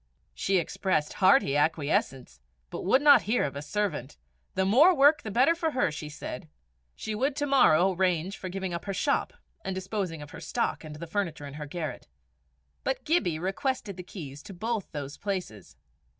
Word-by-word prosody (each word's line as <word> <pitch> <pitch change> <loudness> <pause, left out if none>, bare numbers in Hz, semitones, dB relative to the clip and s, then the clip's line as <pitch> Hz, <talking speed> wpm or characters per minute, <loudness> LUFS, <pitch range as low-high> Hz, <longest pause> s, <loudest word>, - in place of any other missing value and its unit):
She 195 0 +1
expressed 170 -2 0
hearty 190 - +5
acquiescence, 145 - 0 0.3
but - - -5
would 260 +9 +3
not 290 -2 +8
hear 245 - +3
of 140 -1 -3
a 140 - -4
servant: 150 - -3 0.4
the 190 0 +2
more 290 - +6
work 290 +2 +5
the 215 - -6
better 255 +10 +4
for 330 -1 -1
her! 255 - +1
she 150 0 -6
said. 125 - -7 0.5
She 220 - -5
would 265 +6 0
to 290 0 -1
morrow 195 - +5
arrange 180 0 0
for 185 - -6
giving 190 -1 -4
up 170 - -5
her 195 -1 -3
shop - - +1 0.3
and 190 - -3
disposing 185 -4 -3
of 145 - -12
her 170 - -9
stock 165 - -2
and 155 -1 -8
the 165 +3 -7
furniture 165 -4 -3
in 140 - -8
her 150 0 -7
garret. 155 -3 -5 0.8
But 265 - -2
Gibbie 190 - +1
requested 200 - -2
the 180 - -7
keys 150 -6 -9
of 190 - -9
both 225 -2 -2
those 145 -1 -6
places. 180 - -5
185 Hz, 185 wpm, -28 LUFS, 155-220 Hz, 0.8 s, not